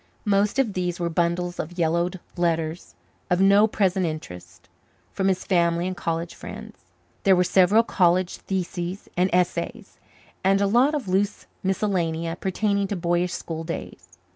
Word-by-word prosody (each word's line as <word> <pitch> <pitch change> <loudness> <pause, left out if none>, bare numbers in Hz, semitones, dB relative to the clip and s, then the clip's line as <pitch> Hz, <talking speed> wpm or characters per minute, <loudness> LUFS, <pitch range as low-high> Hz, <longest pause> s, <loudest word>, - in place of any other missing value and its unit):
Most 205 +2 +2
of 250 -7 +1
these 180 -1 -2
were 170 -1 -1
bundles 175 +1 -1
of 175 +3 -5
yellowed 170 +2 0 0.2
letters, 165 -1 -1 0.3
of 180 - +2
no 200 +2 +6
present 190 -3 +1
interest, 155 - -6 0.4
from 190 - -1
his 185 -1 0
family 170 -2 +2
and 185 0 -3
college 165 0 -3
friends. - - -10 0.4
There 195 -1 +5
were 180 - +3
several 190 +5 +4
college 180 -3 +2
theses 185 0 -4
and 180 +1 +2
essays, 180 +5 -1 0.4
and 195 +1 +3
a 200 - +2
lot 245 +9 +3
of 280 -8 -3
loose 195 +2 0 0.2
miscellania 170 -4 -1
pertaining 200 +2 0
to 200 - -3
boyish 175 0 0
school 165 -1 -5
days. 95 - -7
180 Hz, 150 wpm, -24 LUFS, 170-195 Hz, 0.4 s, no